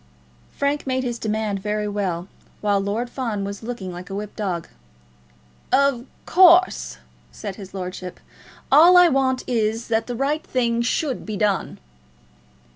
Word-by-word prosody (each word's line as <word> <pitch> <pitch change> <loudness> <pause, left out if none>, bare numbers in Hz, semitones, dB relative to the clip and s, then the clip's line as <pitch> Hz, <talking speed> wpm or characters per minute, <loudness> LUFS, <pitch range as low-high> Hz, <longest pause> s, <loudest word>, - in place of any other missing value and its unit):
Frank 280 0 -2
made 260 0 0
his 240 -2 -3
demand 215 -2 -2
very 210 +1 -2
well, 190 -4 -2 0.3
while 205 -1 +2
Lord 210 +5 -2
Fawn 230 -5 -3
was 200 0 -5
looking 220 -5 -6
like 180 +1 -9
a 195 - -5
whipped 205 0 -6
dog. 185 -6 -3 1.0
"Of 275 -3 +2 0.2
course," 365 0 +5 0.3
said 200 -3 -7
his 195 -2 -10
lordship, 185 -1 -6 0.5
"all 335 +6 +8
I 355 -1 +7
want 260 -2 +1
is, 225 -1 -1
that 225 0 0
the 245 - -4
right 290 +5 -1
thing 235 -2 0
should 260 +2 -1
be 215 -1 -5
done." 205 -3 0
225 Hz, 145 wpm, -22 LUFS, 200-260 Hz, 1.0 s, all